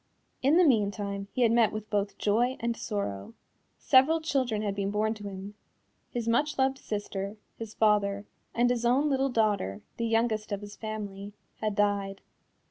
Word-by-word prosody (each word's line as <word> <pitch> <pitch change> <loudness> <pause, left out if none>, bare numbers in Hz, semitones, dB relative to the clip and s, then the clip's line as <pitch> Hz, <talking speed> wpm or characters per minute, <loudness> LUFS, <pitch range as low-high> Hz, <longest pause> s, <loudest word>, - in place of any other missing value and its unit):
In 280 +5 +4
the 365 - +6
meantime 200 - +1
he 255 - +1
had 230 - +4
met 230 -2 +4
with 215 0 -7
both 205 -1 -1
joy 240 +5 +1
and 235 0 -1
sorrow. 200 - -4 0.4
Several 285 +5 +4
children 255 -9 0
had 205 -2 -1
been 200 0 -2
born 215 +2 0
to 205 -2 -7
him. 195 +1 -8 0.6
His 235 -2 -4
much 290 +6 +1
loved 265 0 +1
sister, 205 -1 -4 0.2
his 225 -1 -7
father, 205 -2 +2 0.3
and 245 +1 +3
his 240 -1 -1
own 270 +5 +3
little 270 0 +1
daughter, 205 - 0 0.2
the 230 - -1
youngest 225 -1 0
of 200 0 -2
his 205 0 -9
family, 205 -2 -6 0.2
had 215 -2 -2
died. 200 -1 0
215 Hz, 170 wpm, -29 LUFS, 200-240 Hz, 0.6 s, the